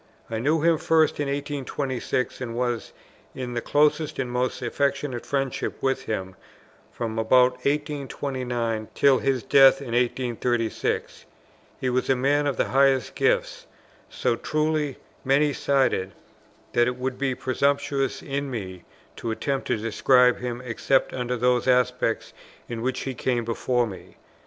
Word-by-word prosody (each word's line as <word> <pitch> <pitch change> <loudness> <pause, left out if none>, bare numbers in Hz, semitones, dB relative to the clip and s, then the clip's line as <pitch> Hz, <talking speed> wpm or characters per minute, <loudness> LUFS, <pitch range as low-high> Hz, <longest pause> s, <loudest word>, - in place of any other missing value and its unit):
I 110 - -1
knew 150 +6 +1
him 165 -1 +3
first 160 -2 +2
in 145 - 0
1826, 140 -3 -3
and 115 -2 -4
was 120 -1 -2 0.4
in 125 -2 -5
the 120 - -2
closest 150 +2 +2
and 125 -2 -2
most 125 +1 -1
affectionate 140 0 -1
friendship 135 -2 -2
with 135 0 -1
him 95 -3 -4 0.6
from 115 -1 -4
about 125 +3 +5 0.2
1829 130 -6 -2
till 135 -2 +4
his 135 -4 0
death 135 +2 +6
in 135 -3 -8
1836. 120 -2 -1 0.5
He 130 - -1
was 130 +2 0
a 135 - +4
man 145 +3 +2
of 140 - -1
the - - 0
highest 135 -3 +3
gifts, - - 0 0.4
so 115 - 0
truly 150 +1 -1 0.3
many 140 +2 +3
sided, 130 -11 +1 0.6
that 120 0 +4
it 125 - -1
would 130 0 -3
be 135 -2 0
presumptuous 135 +1 0
in 140 0 -3
me 95 -7 -6 0.3
to 115 - -4
attempt 135 +4 -2
to - - +1
describe 125 +3 +3
him, 125 0 -4
except 130 +3 +1
under 125 -1 -2
those 125 +1 +2
aspects 125 -2 +1 0.3
in 115 -1 -5
which 130 +2 -1
he 135 - -3
came 120 -1 -1
before 120 +1 0
me. 95 -5 -10
130 Hz, 145 wpm, -25 LUFS, 120-140 Hz, 0.6 s, death